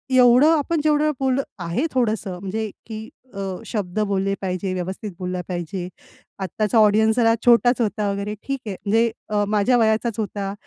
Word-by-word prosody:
एवढं 250 +5 +6
आपण 305 +2 0
जेवढं 305 0 +3
बोललं 265 0 +1 0.2
आहे 175 - -1
थोडंसं 215 -7 -1
म्हणजे 210 +3 -3 0.2
की 220 0 -7 0.2
अ, 200 - -7 0.3
शब्द 205 -3 -3
बोलले 195 0 0
पाहिजे, 185 0 -2
व्यवस्थित 190 +3 -4
बोलला 180 0 -3
पाहिजे. 175 +1 -4 0.5
आत्ताचा 210 +4 -1
ऑडियन्स 220 +1 +4
जरा 225 -1 +4
छोटाच 245 +1 +5
होता 210 -1 0
वगैरे 200 +1 -3
ठीक 275 -1 -3
आहे. 195 - -3
म्हणजे 225 +2 +3 0.2
अ, 205 -1 +1
माझ्या 215 +4 +3
वयाचाच 220 0 +1
होता. 200 -2 -3
215 Hz, 160 wpm, -22 LUFS, 195-240 Hz, 0.5 s, एवढं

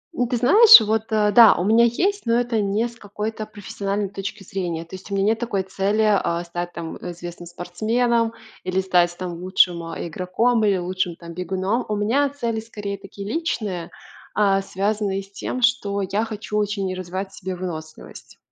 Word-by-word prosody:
У 245 - 0
ты 245 0 -1
знаешь, 425 - +9
вот, 220 +1 0
э, 210 -1 +3
да, 230 +1 +8
у - - -1
меня 225 +3 +5
есть, 375 - 0
но 230 +1 +3
это 240 -3 0
не 205 +4 0
с 235 - -13
какой-то 215 0 -5
профессиональной 200 -1 -4
точки 195 +1 -6
зрения. 175 -4 -4
То 170 - -10
есть 190 +2 -11
у 200 - -2
меня 195 - +1
нет 220 +2 +2
такой 205 -5 -1
цели, 195 +3 0
а, 175 -5 +1
стать 175 +1 -5
там 165 -1 -6
известным 175 0 -8
спортсменом 225 +7 0 0.3
или 185 +1 -1
стать, 175 -2 +2
там 180 -1 -4
лучшим, 180 -2 +2
э, 165 - -5
игроком, 215 +8 0
или 200 -2 +3
лучшим 180 -1 -2
там 170 -1 -10
бегуном. 190 +6 -1
У 210 - 0
меня 240 +8 +1
цели 235 -5 -3
скорее 205 -3 -6
такие 200 0 -9
личные, 210 - -3 0.5
а, 195 -2 +3
связанные 195 0 -1
с 195 - -19
тем, 250 +5 -4
что 220 -5 +2
я 200 +4 -1
хочу 215 -1 -5
очень 200 -2 -1
развивать 185 +2 -5
в - - -15
себе 190 -1 -4
выносливость. 160 -3 -8
200 Hz, 185 wpm, -22 LUFS, 185-225 Hz, 0.5 s, знаешь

